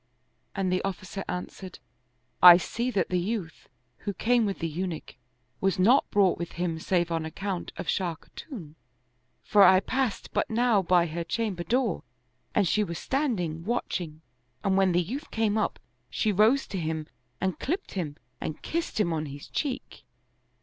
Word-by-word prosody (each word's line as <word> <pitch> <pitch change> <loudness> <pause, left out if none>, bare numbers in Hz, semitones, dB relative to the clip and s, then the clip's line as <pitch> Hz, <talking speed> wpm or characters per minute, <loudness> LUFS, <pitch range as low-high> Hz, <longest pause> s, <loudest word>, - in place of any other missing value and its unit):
and 190 -2 0
the 185 - +1
officer 195 0 -4
an 180 0 -2
swered, 185 -2 -11 0.4
" 125 0 -44
I 170 - +8
see 235 +7 -2
that 195 -8 0
the 180 - +1
youth, 185 -4 -4 0.3
who 200 -1 -5
came 235 -1 +2
with 195 - -2
the 165 - -2
Eunuch, 170 +1 -4 0.5
was 195 -2 +1
not 230 +9 +4
brought 200 -3 +3
with 170 - -5
him 170 -2 -2
save 175 0 0
on 165 -1 0
account 185 +3 -4
of - - -5
Shah 175 0 0
Khatun; 180 - -10 0.7
for 210 - +4
I 190 -1 +8
passed 255 +2 -2
but - - 0
now 230 -2 +3
by 175 -1 +3
her 170 +1 -3
chamber 195 -1 -2
door, 235 -3 0 0.5
and 200 -3 +3
she 210 +6 +2
was 170 -4 -4
standing, 190 - -1
watching; 175 -7 -3 0.4
and 195 -1 +2
when 190 -1 +4
the 175 +1 +2
youth 265 - -6
came 220 -2 +1
up, 220 - 0 0.3
she 215 - +1
rose 220 +8 +4
to 190 - -3
him 160 -1 -2 0.3
and 185 -4 -1
clipped 360 +8 -2
him 160 -7 -3 0.3
and 155 - -4
kissed 335 -7 -2
him 170 -5 +2
on 155 -1 -2
his 140 0 -9
cheek." 275 -4 -4
190 Hz, 175 wpm, -28 LUFS, 170-220 Hz, 0.7 s, I